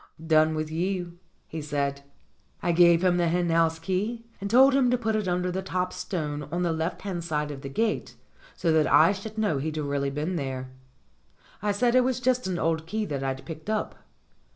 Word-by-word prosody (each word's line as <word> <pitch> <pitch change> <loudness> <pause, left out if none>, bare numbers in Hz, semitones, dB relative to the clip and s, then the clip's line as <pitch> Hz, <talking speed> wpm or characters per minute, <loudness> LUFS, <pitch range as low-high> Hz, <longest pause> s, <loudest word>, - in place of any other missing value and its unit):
"Done 155 0 +4
with 155 0 -3
you," 175 +1 -2 0.3
he 160 - -6
said. 140 -2 -2 0.6
I 175 - +2
gave 170 0 +5
him 180 -1 +3
the 175 -1 +2
hen 175 0 +1
house 165 0 +3
key 200 +7 -2 0.2
and 200 - -3
told 265 +4 +6
him 265 -2 +4
to 250 - +2
put 225 -2 -1
it 210 -3 -1
under 180 0 0
the 190 +1 -2
top 185 -1 -2
stone 150 -6 -4
on 175 +1 -1
the 170 -2 +1
left 160 +3 -3
hand 185 -4 -3
side 150 -2 -2
of 135 -2 -8
the 135 - -6
gate, 220 +10 -1 0.4
so 165 - +1
that 160 -1 +3
I 160 +4 +7
should 210 +2 -7
know 205 -10 +1
he'd 155 +2 -3
really 140 -2 -1
been 150 +6 -2
there. 130 -3 -4 0.9
I 205 +1 +1
said 235 +4 +2
it 255 - +6
was 255 -1 0
just 250 -3 +1
an 185 -2 -2
old 160 -1 -1
key 215 +3 -2
that 140 -6 -3
I'd 135 0 -3
picked 160 +3 -8
up. 215 -1 -1
170 Hz, 210 wpm, -26 LUFS, 155-200 Hz, 0.9 s, I